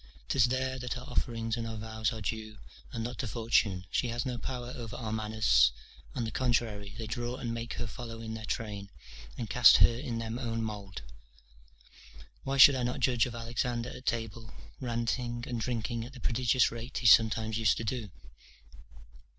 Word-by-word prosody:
'Tis 130 -3 +4
there 130 +1 -1
that 125 0 -3
our 125 - -8
offerings 115 -2 -1
and 115 -1 -4
our 115 - -5
vows 110 +1 -2
are 110 -2 -6
due, 110 +1 -4 0.3
and 115 -2 -3
not 120 +1 -5
to 125 - -2
fortune 105 -4 +1
she 125 - +1
has 120 +2 -2
no 125 -2 -2
power 125 0 -5
over 115 -3 -6
our 110 -3 -4
manners; 110 - +4 0.4
on 125 - -1
the 110 - -3
contrary, 110 -5 -1
they 115 - -4
draw 120 +3 -3
and 120 -2 -4
make 115 0 -4
her 120 - -3
follow 115 0 -7
in 110 -1 -6
their 110 0 -6
train, 100 -4 -4 0.5
and 115 - -4
cast 125 -3 +8
her - - +6
in 120 -2 -4
their 115 -1 -4
own 115 -3 -2
mould. 100 - -6 1.4
Why 135 +1 -1
should 140 +1 +10
not 125 -2 0
I - - -6
judge 125 -1 +2
of 120 - -7
Alexander 120 +1 -2
at 130 - -11
table, 115 0 -2 0.3
ranting 120 0 -2
and 120 -2 -3
drinking 115 0 -2
at 125 +4 -9
the 130 - -10
prodigious 125 +2 +2
rate 115 +3 -6
he - - -4
sometimes 110 0 +5
used 110 -3 +3
to - - -3
do? 115 -2 -3
115 Hz, 190 wpm, -31 LUFS, 110-125 Hz, 1.4 s, should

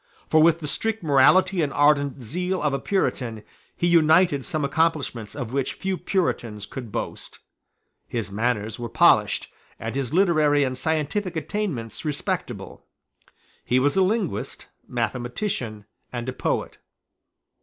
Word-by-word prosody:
For 155 - +6
with 165 +1 +4
the 150 - -4
strict 225 +6 -1
morality 165 +6 +4
and 145 -3 0
ardent 145 -2 +2
zeal 180 +9 -2
of 150 -2 0
a 140 - 0
Puritan 125 - -1 0.3
he - - 0
united 160 -3 +4
some 150 +1 -1
accomplishments 140 -7 -1
of 125 -4 -5
which 135 -1 -1
few 190 -1 -2
Puritans 120 - -2
could 120 0 -8
boast. - - -5 0.7
His 110 -4 -3
manners 110 0 -1
were 120 -1 -4
polished, - - +3 0.3
and - - -5
his 135 -2 -2
literary 155 -5 +3
and 130 -1 -1
scientific 160 +7 -1
attainments 160 - -3
respectable. 150 -3 -4 0.8
He 125 - +1
was 140 +2 +2
a 190 - +4
linguist, 185 - -1 0.2
mathematician, 120 - -3 0.3
and 120 0 -5
a 130 - -2
poet. - - -2
145 Hz, 135 wpm, -24 LUFS, 120-170 Hz, 0.8 s, For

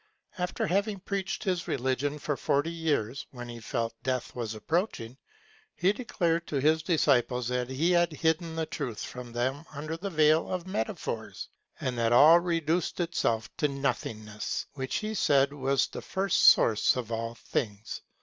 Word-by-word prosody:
After 180 0 -1
having 200 +3 0
preached 195 -1 -3
his 180 -3 -1
religion 130 +3 -1
for 145 0 -2
forty 145 +5 0
years, 145 -7 -1
when 120 -2 -8
he 120 -1 -7
felt 115 0 -2
death 130 -2 -2
was 115 -3 -3
approaching, 130 - -2 0.6
he 185 +3 +3
declared 170 -8 -1
to - - -4
his 155 +3 +3
disciples 130 -7 +2
that 125 0 -1
he 150 +7 +1
had 175 -1 +3
hidden 160 +1 0
the 165 0 -1
truth 125 -9 -5
from 125 -1 -8
them 130 +5 -1
under 155 +2 -4
the 200 +4 -4
veil 155 -2 +3
of 180 -2 -2
metaphors, 110 -12 -4 0.3
and 125 - -2
that 115 0 +2
all 155 +7 +8
reduced 170 0 0
itself 115 -10 -1
to 150 - +2
Nothingness, 125 -6 -3
which 130 -2 -4
he 215 0 -2
said 140 -8 +3
was 135 -1 +1
the - - -7
first 195 0 +1
source 110 -2 +6
of 120 -3 -4
all 115 +1 -3
things. 110 -1 -4
145 Hz, 160 wpm, -29 LUFS, 120-170 Hz, 0.6 s, all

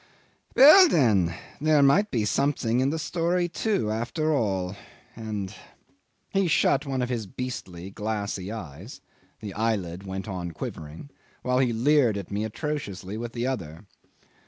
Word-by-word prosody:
Well, 320 +7 +9
then, 100 - +3 0.2
there 150 -1 +4
might 195 +10 +4
be 115 -5 0
something 125 -2 +1
in 130 +1 +2
the 160 - -2
story 175 +2 0
too, 175 - -1
after 155 +8 -1
all, 95 -7 -1 0.4
and.. 105 -3 -5 0.4
." - - -41 0.3
He 195 -1 +2
shut 140 -3 +2
one 130 -2 -1
of 125 - -3
his 115 -5 -3
beastly 95 -6 -6
glassy 100 -2 -3
eyes 95 - -8 0.4
(the 105 -3 -6
eyelid 100 -5 -1
went 95 +1 -6
on 90 -4 -5
quivering) 80 - -8 0.3
while 125 0 +1
he 130 -2 +2
leered 120 -1 +3
at 100 -1 -7
me 100 +1 -1
atrociously 110 - -4
with 115 +1 -5
the 120 0 -2
other. 90 -9 -4
115 Hz, 150 wpm, -26 LUFS, 95-140 Hz, 0.4 s, Well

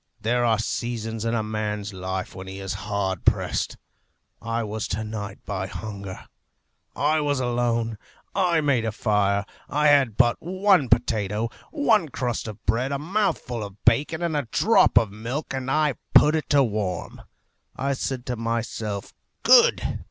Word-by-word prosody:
There 120 +3 +1
are 115 -2 +3
seasons 115 0 -3
in 115 +1 0
a 110 - 0
man's 105 -1 -3
life 95 0 -4
when 95 0 -8
he 95 +1 -7
is 95 -1 -4 0.2
hard 95 -3 -1
pressed. - - +1 0.6
I 115 +1 -2
was 110 0 -3
to 105 +3 -2
night, 105 -2 -5
by 95 -2 -3
hunger. 100 -2 -7 0.7
I 155 +2 +2
was 145 -2 0
alone. 120 -3 0 0.3
I 180 -4 +2
made 140 -6 +2
a 110 - -1
fire. 100 -2 +1 0.2
I 150 +1 +3
had 135 -7 +4
but 120 -2 +4
one 185 - +2
potato, 110 -1 +1 0.2
one 230 - +2
crust 120 -3 -3
of 105 -1 -9
bread, 120 +6 +1
a 140 - 0
mouthful 150 - -1
of 100 -1 -8
bacon, 150 +8 +3
and 170 -2 0
a 145 -5 -1
drop 225 +1 +4
of 110 -3 +4
milk, 120 +10 -5
and 130 0 -3
I 150 0 +2 0.2
put 150 - +7
it 155 - -2
to 140 -1 +5
warm. 105 -6 -3 0.5
I 140 +1 -1
said 130 -1 -3
to 125 - -2
myself, 115 -3 -3 0.3
'Good.' - - +5
115 Hz, 160 wpm, -24 LUFS, 105-140 Hz, 0.7 s, put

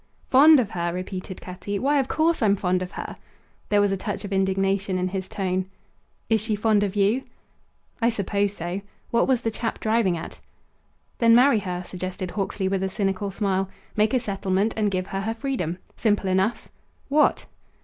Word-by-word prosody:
"Fond 295 +3 +7
of 220 -5 -1
her!" 175 -1 -1
repeated 185 +1 -6
Cutty. 195 +2 -5
"Why, 285 +5 +2
of 265 - 0
course 325 +3 +1
I'm 205 -3 +4
fond 185 -1 0
of 180 0 -5
her!" - - -6 0.5
There 205 - +4
was 205 -1 +3
a 195 - 0
touch 205 +2 -4
of 200 - -4
indignation 195 0 +1
in 185 0 0
his 190 0 -4
tone. 185 -2 -1 0.6
"Is 220 -2 +2
she 215 -1 -1
fond 210 0 +2
of 205 -1 -1
you?" 205 +5 +2 0.8
"I 230 - +4
suppose 200 -2 0
so." 175 +3 -4 0.3
What 235 - +3
was 260 -3 +2
the 225 - 0
chap 225 +1 -3
driving 220 -5 +1
at? 165 - -8 0.8
"Then 230 -1 +6
marry 250 -1 +6
her," 180 -2 -4
suggested 185 0 -5
Hawksley 195 -1 -2
with 190 0 0
a 190 - 0
cynical 195 0 -1
smile; 195 -1 -1 0.3
"make 215 +3 +2
a - - +4
settlement 200 -1 0
and 215 -2 +1
give 185 -1 -1
her 195 0 -3
her 225 +3 -2
freedom. 225 - -2 0.2
Simple 210 -3 +1
enough. 190 +5 0 0.4
What?" 295 +2 +3
200 Hz, 185 wpm, -24 LUFS, 185-225 Hz, 0.8 s, Fond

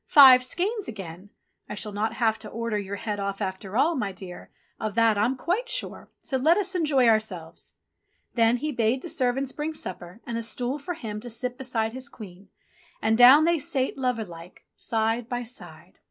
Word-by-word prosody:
Five 260 -3 +9
skeins 390 - -2
again! 190 -3 -8 0.4
I - - -4
shall 210 +1 -4
not 215 +2 -1
have 225 -3 +1
to 220 - -8
order 230 -1 -3
your 200 0 -5
head 205 0 -4
off 200 0 -3
after 190 +1 -4
all, 315 +6 +3
my 205 -7 -2
dear, 185 -1 -10 0.3
of 215 -2 -3
that 230 -2 +4
I'm 220 +6 +1
quite 405 - -1
sure, - - -3
so 265 - -1
let 315 +7 +4
us 390 -2 0
enjoy 295 -8 +3
ourselves." 215 -7 -1 0.6
Then 230 0 +3
he 305 +5 -3
bade 235 0 0
the 345 - -5
servants 260 0 0
bring 305 +2 -4
supper, 180 - -6
and 230 -1 -3
a - - -3
stool 245 +5 -2
for 345 +5 -5
him 220 -9 -6
to 240 - -8
sit 245 +2 -4
beside 230 -4 -2
his 260 +2 -6
Queen, 195 -5 -12 0.5
and 220 +1 +2
down 255 +6 +8
they 340 -1 +2
sate 265 -1 -1
lover 250 -4 -1
like, 170 0 -13
side 225 +1 -1
by 245 -1 -2
side. 240 +2 -11
230 Hz, 195 wpm, -26 LUFS, 210-265 Hz, 0.6 s, Five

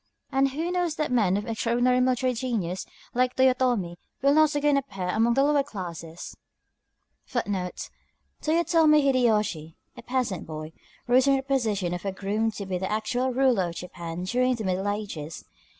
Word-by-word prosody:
And 270 0 +3
who 320 +6 -3
knows 355 -3 0
that 305 -4 -2
men 205 -6 +3
of 205 - -3
extraordinary 245 +2 +1
military 255 0 +1
genius, 220 -8 -3 0.3
like 250 +1 +1
Toyotomi, 250 -9 +2 0.3
will 280 +1 +5
not 310 -1 +4
again 290 0 +3
appear 195 -10 -3
among 230 +5 +2
the 270 - +4
lower 290 0 +3
classes?" 175 - -7 1.0
Toyotomi 200 -7 -1 1.3
Hidéyoshi, 215 - +1 0.2
a - - -10
peasant 245 -7 -2
boy, 155 0 -7 0.3
rose 250 +1 +4
from 275 -1 +4
the 270 - -1
position 220 -10 0
of 175 - -5
a 195 - -2
groom 205 +4 -1
to 200 - -6
be 185 -1 -2
the 190 +2 -3
actual 245 +4 0
ruler 250 -8 +2
of 170 - -9
Japan 175 -1 -6
during 250 +6 +1
the 225 - -5
Middle 190 +1 -1
Ages. 200 -7 -4
230 Hz, 160 wpm, -26 LUFS, 185-260 Hz, 1.3 s, will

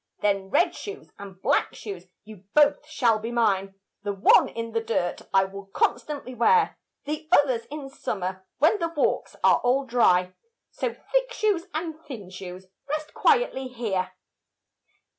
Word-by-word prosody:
Then 195 -2 +1
red 330 - +3
shoes 410 0 -8
and 195 -2 -10
black 270 +9 +1
shoes, 190 -4 -8 0.2
you 210 -3 -13
both 295 0 +4
shall 240 -8 +2
be 225 +2 -5
mine, 195 -5 +1 0.3
The 205 -1 -2
one 195 - +5
in 230 0 -5
the 225 0 0
dirt 220 -6 -1
I 195 0 +4
will 195 +1 -9
constantly 275 +6 -1
wear, 335 - +3 0.3
The 305 +2 -4
others 260 -8 +4
in 295 -1 -6
summer, 190 -8 -4
when 320 +8 +4
the 335 -1 0
walks 330 -3 -1
are - - +6
all 260 +3 +1
dry: 185 -7 +3 0.4
So 480 - -2 0.2
thick - - +2
shoes 400 -6 0
and 320 -1 -4
thin 210 -10 -8
shoes 185 0 -8 0.2
rest 305 +1 -3
quietly 450 - +2
here. 200 -7 -2
235 Hz, 155 wpm, -26 LUFS, 195-300 Hz, 0.4 s, are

